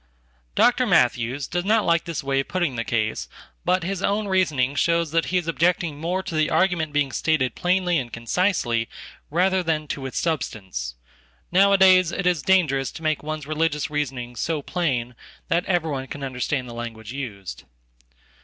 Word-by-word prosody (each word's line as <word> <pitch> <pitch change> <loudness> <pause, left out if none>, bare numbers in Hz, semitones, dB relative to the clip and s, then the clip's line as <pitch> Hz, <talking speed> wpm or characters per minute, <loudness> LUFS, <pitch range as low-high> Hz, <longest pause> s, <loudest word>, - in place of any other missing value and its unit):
Dr. 245 +1 +4
Matthews 125 - +2
does 175 +3 -2
not 215 +2 +2
like 170 0 +2
this 165 -4 -4
way 135 0 +1
of 135 - -2
putting 175 -8 -1
the 115 - -2
case, 110 -2 -1 0.3
but 185 -1 +2
hisown 200 +3 -1
reasoning 155 -9 +1
shows 170 +1 +1
that 165 0 +2
he 185 - 0
is 175 -2 -2
objecting 165 -2 +1
more 180 +4 -1
to - - -6
the 155 -1 +2
argument 165 -2 +1
beingstated 145 -2 +1
plainly 180 -2 +1
and 120 -2 -6
concisely 115 - 0 0.4
rather 185 +4 +2
than 160 -3 -1
to 135 -2 -3
its 130 - -6
substance. 95 - -3 0.6
Nowadaysit 190 -1 +5
is 175 -4 +2
dangerous 140 -7 +2
to 160 - -9
make 155 -1 0
one's 155 -1 -5
religious 155 -1 -1
reasoning 130 -5 -3
so 155 +3 -2
plain 130 -10 -1 0.4
thateveryone 165 -6 0
can 145 - -6
understand 130 0 -2
the 120 - -8
language 115 -1 -7
used. 105 - -7
155 Hz, 155 wpm, -24 LUFS, 130-180 Hz, 0.6 s, Nowadaysit